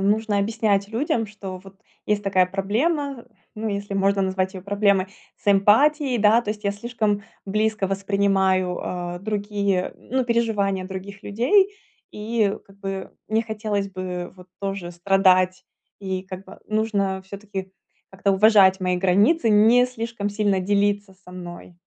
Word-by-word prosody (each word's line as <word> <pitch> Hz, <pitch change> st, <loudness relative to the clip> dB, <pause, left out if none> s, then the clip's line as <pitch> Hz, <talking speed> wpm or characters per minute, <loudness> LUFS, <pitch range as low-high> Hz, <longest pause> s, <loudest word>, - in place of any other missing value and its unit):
нужно 210 Hz, +1 st, +1 dB
объяснять 200 Hz, -1 st, +1 dB
людям, 225 Hz, 0 st, -1 dB
что 195 Hz, -3 st, -8 dB
вот 195 Hz, 0 st, -15 dB, 0.3 s
есть 210 Hz, -1 st, +1 dB
такая 185 Hz, -2 st, +3 dB
проблема, 250 Hz, -, -1 dB, 0.3 s
ну, 220 Hz, +1 st, -3 dB
если 200 Hz, 0 st, -4 dB
можно 195 Hz, 0 st, +2 dB
назвать 190 Hz, 0 st, -1 dB
её 185 Hz, -, -7 dB
проблемой 200 Hz, -1 st, +2 dB, 0.3 s
с 205 Hz, -, 0 dB
эмпатией. 250 Hz, +7 st, +4 dB
Да, 215 Hz, +2 st, +5 dB
то 210 Hz, -, -4 dB
есть 210 Hz, 0 st, -6 dB
я 200 Hz, -, +1 dB
слишком 210 Hz, -2 st, -1 dB, 0.2 s
близко 215 Hz, 0 st, 0 dB
воспринимаю, 195 Hz, -2 st, +1 dB
а, 175 Hz, 0 st, -4 dB
другие, 200 Hz, -2 st, -1 dB
ну, 260 Hz, 0 st, -2 dB
переживания 210 Hz, -5 st, 0 dB
других 195 Hz, +2 st, -8 dB
людей 380 Hz, -, +2 dB, 0.4 s
и 210 Hz, -1 st, -1 dB
как 195 Hz, 0 st, -20 dB
бы 195 Hz, -1 st, -5 dB, 0.2 s
не 220 Hz, +1 st, +1 dB
хотелось 210 Hz, -2 st, -3 dB
бы 180 Hz, -1 st, -5 dB
вот 180 Hz, 0 st, -14 dB
тоже 195 Hz, -3 st, -4 dB
страдать. 185 Hz, 0 st, +3 dB, 0.3 s
И 190 Hz, -1 st, -3 dB
как 190 Hz, 0 st, -8 dB
бы -, -, -13 dB
нужно 200 Hz, -3 st, -1 dB
всё-таки 195 Hz, -1 st, -7 dB, 0.4 s
как-то 195 Hz, +1 st, 0 dB
уважать 195 Hz, -2 st, +5 dB
мои 180 Hz, -1 st, 0 dB
границы, 205 Hz, -, +3 dB
не 225 Hz, +4 st, +6 dB
слишком 230 Hz, -4 st, -4 dB
сильно 205 Hz, -2 st, +1 dB
делиться 205 Hz, 0 st, 0 dB
со 180 Hz, -, -13 dB
мной. 175 Hz, -1 st, -9 dB
200 Hz, 145 wpm, -23 LUFS, 190-215 Hz, 0.4 s, не